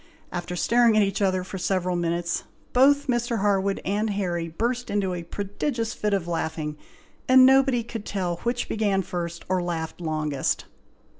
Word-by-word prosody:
After 175 Hz, 0 st, -4 dB
staring 235 Hz, +3 st, +4 dB
at 215 Hz, -, +6 dB
each 195 Hz, 0 st, -1 dB
other 185 Hz, -2 st, +2 dB
for 190 Hz, +1 st, -7 dB
several 180 Hz, -1 st, 0 dB
minutes, 170 Hz, 0 st, -1 dB, 0.3 s
both 280 Hz, +3 st, +5 dB
Mr. 240 Hz, -4 st, 0 dB
Harwood 200 Hz, -1 st, +1 dB
and 210 Hz, +3 st, 0 dB
Harry 175 Hz, -4 st, -1 dB
burst 240 Hz, +9 st, -2 dB
into 200 Hz, -3 st, 0 dB
a 175 Hz, -, -4 dB
prodigious 215 Hz, -, -3 dB
fit 210 Hz, -, -1 dB
of 195 Hz, -4 st, 0 dB
laughing, 160 Hz, -2 st, -2 dB, 0.5 s
and 255 Hz, 0 st, +8 dB
nobody 265 Hz, -2 st, +4 dB
could 225 Hz, -2 st, -6 dB
tell 180 Hz, -5 st, -2 dB
which 240 Hz, +5 st, -2 dB
began 205 Hz, -3 st, +1 dB
first 170 Hz, -1 st, -5 dB
or 185 Hz, -1 st, +1 dB
laughed 170 Hz, -1 st, -4 dB
longest. 155 Hz, -4 st, -1 dB
195 Hz, 160 wpm, -25 LUFS, 175-230 Hz, 0.5 s, and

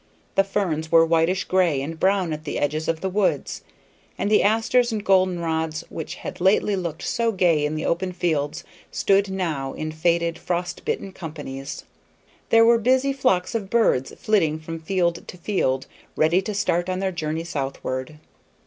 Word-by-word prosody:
The 195 Hz, -, +4 dB
ferns 175 Hz, -6 st, -2 dB
were 165 Hz, -1 st, +7 dB
whitish 165 Hz, +3 st, +2 dB
gray 180 Hz, -6 st, +2 dB
and 160 Hz, +4 st, -5 dB
brown 190 Hz, -4 st, +2 dB
at 155 Hz, 0 st, -6 dB
the 150 Hz, -, -4 dB
edges 155 Hz, +2 st, -1 dB
of 165 Hz, -1 st, -1 dB
the 190 Hz, -, -1 dB
woods, 195 Hz, 0 st, 0 dB, 0.6 s
and 205 Hz, -, -1 dB
the 215 Hz, -, +5 dB
asters 225 Hz, +3 st, +2 dB
and 215 Hz, -2 st, -3 dB
golden 185 Hz, -2 st, +3 dB
rods 160 Hz, -1 st, -2 dB
which 160 Hz, -, -6 dB
had -, -, -8 dB
lately 195 Hz, +2 st, +3 dB
looked 170 Hz, -4 st, -4 dB
so 230 Hz, -1 st, 0 dB
gay 175 Hz, -7 st, +2 dB
in 150 Hz, +1 st, -1 dB
the 155 Hz, -, -3 dB
open 185 Hz, +2 st, 0 dB
fields 160 Hz, -2 st, -1 dB, 0.3 s
stood 195 Hz, 0 st, +2 dB
now 160 Hz, -8 st, -2 dB
in 155 Hz, 0 st, -4 dB
faded, 170 Hz, +1 st, 0 dB
frost 175 Hz, 0 st, -3 dB
bitten 195 Hz, -, -2 dB
companies. 145 Hz, -6 st, -7 dB, 0.7 s
There 225 Hz, 0 st, +6 dB
were 235 Hz, 0 st, +5 dB
busy 260 Hz, +4 st, +2 dB
flocks 190 Hz, -9 st, +1 dB
of 210 Hz, -4 st, -3 dB
birds 210 Hz, -, +2 dB
flitting 190 Hz, -10 st, +1 dB
from 165 Hz, +1 st, -7 dB
field 170 Hz, 0 st, -1 dB
to -, -, -9 dB
field, 165 Hz, -8 st, 0 dB, 0.3 s
ready 165 Hz, +4 st, +3 dB
to 210 Hz, +2 st, -4 dB
start 175 Hz, -3 st, 0 dB
on 185 Hz, -, -1 dB
their 190 Hz, 0 st, -1 dB
journey 160 Hz, -1 st, -3 dB
southward. 135 Hz, -2 st, -4 dB
175 Hz, 175 wpm, -23 LUFS, 155-195 Hz, 0.7 s, were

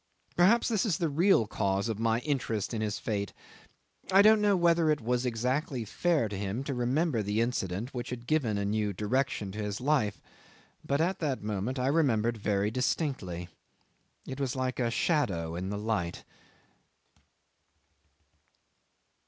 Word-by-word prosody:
Perhaps 200 Hz, +7 st, +4 dB
this 220 Hz, -4 st, +1 dB
is 200 Hz, -8 st, +1 dB
the 170 Hz, -4 st, 0 dB
real 165 Hz, -, +4 dB
cause 100 Hz, 0 st, -1 dB
of 110 Hz, -2 st, -3 dB
my 115 Hz, +1 st, +1 dB
interest 120 Hz, -7 st, -2 dB
in 110 Hz, -, -2 dB
his 105 Hz, -1 st, -1 dB
fate. 100 Hz, -3 st, -3 dB, 0.8 s
I 195 Hz, +1 st, +7 dB
don't 215 Hz, 0 st, +6 dB
know 205 Hz, -2 st, +3 dB
whether 170 Hz, -2 st, +3 dB
it 150 Hz, -1 st, +2 dB
was 125 Hz, +2 st, 0 dB
exactly 125 Hz, +2 st, -1 dB
fair 155 Hz, -, +1 dB
to 105 Hz, -, -6 dB
him 100 Hz, +6 st, -3 dB
to 140 Hz, -, -3 dB
remember 125 Hz, +2 st, +1 dB
the 105 Hz, +1 st, -1 dB
incident 115 Hz, -1 st, -2 dB
which 120 Hz, -2 st, -4 dB
had 120 Hz, -1 st, -6 dB
given 125 Hz, -7 st, +1 dB
a 100 Hz, -, -1 dB
new 105 Hz, 0 st, 0 dB
direction 105 Hz, 0 st, -1 dB
to 105 Hz, +2 st, -5 dB
his 105 Hz, -1 st, -3 dB
life, 130 Hz, -6 st, +1 dB, 0.6 s
but 140 Hz, +2 st, 0 dB
at 185 Hz, +3 st, 0 dB
that 145 Hz, -6 st, -1 dB
very 105 Hz, -, -6 dB
moment 105 Hz, +7 st, -2 dB
I 125 Hz, -, 0 dB
remembered 120 Hz, -6 st, +2 dB
very 105 Hz, 0 st, 0 dB
distinctly. 110 Hz, -, -2 dB, 0.8 s
It 130 Hz, +1 st, -6 dB
was 135 Hz, -2 st, -1 dB
like 130 Hz, -1 st, -2 dB
a 120 Hz, -2 st, +1 dB
shadow 105 Hz, -, 0 dB
in 90 Hz, +2 st, -4 dB
the 100 Hz, -, -3 dB
light. 105 Hz, -5 st, -2 dB
120 Hz, 160 wpm, -29 LUFS, 105-150 Hz, 0.8 s, I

